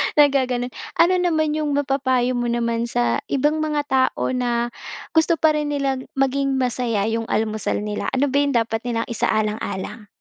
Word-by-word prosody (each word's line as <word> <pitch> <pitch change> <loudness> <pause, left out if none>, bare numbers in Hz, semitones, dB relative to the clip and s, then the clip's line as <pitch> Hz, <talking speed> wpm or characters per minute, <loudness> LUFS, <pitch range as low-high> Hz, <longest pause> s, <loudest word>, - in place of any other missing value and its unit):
Naggaganun. 260 -4 +3 0.2
Ano 345 +2 +4
naman 315 -3 +1
yung 300 -2 -1
mapapayo 260 -3 +1
mo 240 0 -1
naman 235 0 0
sa 120 - +1
ibang 295 +3 +1
mga 300 -1 0
tao 260 -1 +1
na 240 -1 0 0.4
gusto 325 +1 +3
pa 315 0 +3
rin 300 - -1
nila 275 -2 0 0.2
maging 270 0 +1
masaya 245 -4 0
yung 225 0 -2
almusal 215 -1 -1
nila, 210 0 -3
ano 270 +2 +2
ba 280 - +1
yung 285 -3 +1
dapat 225 -1 +1
nilang 230 -1 -2
isaalang-alang? 210 -2 -2
255 Hz, 160 wpm, -22 LUFS, 230-285 Hz, 0.4 s, Ano